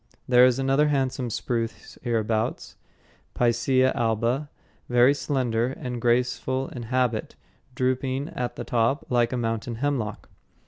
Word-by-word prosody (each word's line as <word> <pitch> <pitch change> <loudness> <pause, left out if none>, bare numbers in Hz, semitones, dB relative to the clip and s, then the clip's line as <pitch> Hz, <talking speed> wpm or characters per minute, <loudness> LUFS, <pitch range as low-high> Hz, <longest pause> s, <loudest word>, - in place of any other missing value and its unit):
There 125 0 +7
is 125 -1 +1
another 135 +2 +2
handsome 130 -3 0
spruce 115 0 -3
hereabouts, 110 -2 -1 0.6
Picea 130 +2 +2
alba, 120 +5 0 0.4
very 125 +2 +5
slender 125 -5 0
and 125 -2 -5
graceful 125 +2 0
in 125 - -7
habit, 125 -3 0 0.4
drooping 130 +2 -1
at 125 -1 -4
the - - -5
top 120 +4 0
like 120 -1 +2
a 130 - -1
mountain 115 0 -2
hemlock. 125 -4 -2
125 Hz, 125 wpm, -25 LUFS, 115-130 Hz, 0.6 s, There